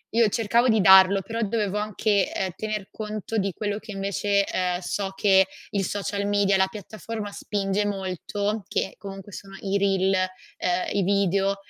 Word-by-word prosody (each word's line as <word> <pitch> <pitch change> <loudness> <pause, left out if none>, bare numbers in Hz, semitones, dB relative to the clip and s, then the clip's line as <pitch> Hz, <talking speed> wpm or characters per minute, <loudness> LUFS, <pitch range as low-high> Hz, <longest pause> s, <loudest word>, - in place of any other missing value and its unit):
io 230 -2 +5
cercavo 230 +4 +2
di 220 -1 +4
darlo, 190 0 +7
però 225 +4 -4
dovevo 210 -2 -1
anche, 210 -1 0
ehm, 190 -1 -2
tener 215 -1 -4
conto 215 0 -5
di 200 -1 0
quello 205 +2 -3
che 220 0 -10
invece, 200 0 0
ehm, 180 -2 -1
so 195 +2 -3
che 190 -1 +4 0.3
il 200 -1 0
social 200 +1 -2
media, 205 -1 +2
la 190 0 +3
piattaforma, 210 +1 -7
spinge 200 0 -1
molto, 200 +2 -3
che 195 - -2
comunque 195 0 -9
sono 195 -1 -9
i 195 0 -1
reel, 195 -1 +2
ehm, 185 -1 -2
i 200 - +1
video, 195 0 +2
200 Hz, 165 wpm, -25 LUFS, 190-210 Hz, 0.3 s, darlo